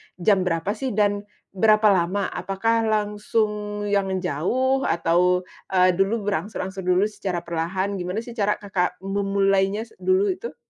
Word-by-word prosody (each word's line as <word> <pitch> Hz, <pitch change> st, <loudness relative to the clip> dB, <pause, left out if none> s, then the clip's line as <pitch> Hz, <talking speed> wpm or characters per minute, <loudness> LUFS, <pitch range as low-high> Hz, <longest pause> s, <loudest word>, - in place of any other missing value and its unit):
jam 185 Hz, 0 st, +2 dB
berapa 165 Hz, +3 st, 0 dB
sih, 235 Hz, 0 st, -3 dB
dan 205 Hz, -1 st, +1 dB, 0.2 s
berapa 215 Hz, +2 st, +4 dB
lama? 190 Hz, +2 st, +1 dB
Apakah 220 Hz, +5 st, 0 dB
langsung 210 Hz, 0 st, -1 dB
yang 200 Hz, -1 st, +1 dB, 0.2 s
jauh 250 Hz, -, +1 dB
atau, 180 Hz, +2 st, +2 dB, 0.2 s
eee, 185 Hz, -1 st, +4 dB
dulu 195 Hz, +5 st, 0 dB
berangsur-angsur 190 Hz, -1 st, -3 dB
dulu 180 Hz, +2 st, +4 dB
secara 195 Hz, -5 st, -3 dB
perlahan, 185 Hz, +4 st, -2 dB
gimana 180 Hz, +5 st, -3 dB
sih 240 Hz, -, -9 dB
cara 210 Hz, -3 st, 0 dB
Kakak 190 Hz, -3 st, -2 dB
memulainya 195 Hz, +1 st, +1 dB
s 230 Hz, -, -17 dB
dulu 380 Hz, +1 st, +2 dB
itu? 385 Hz, +6 st, -6 dB
200 Hz, 140 wpm, -23 LUFS, 185-215 Hz, 0.2 s, berapa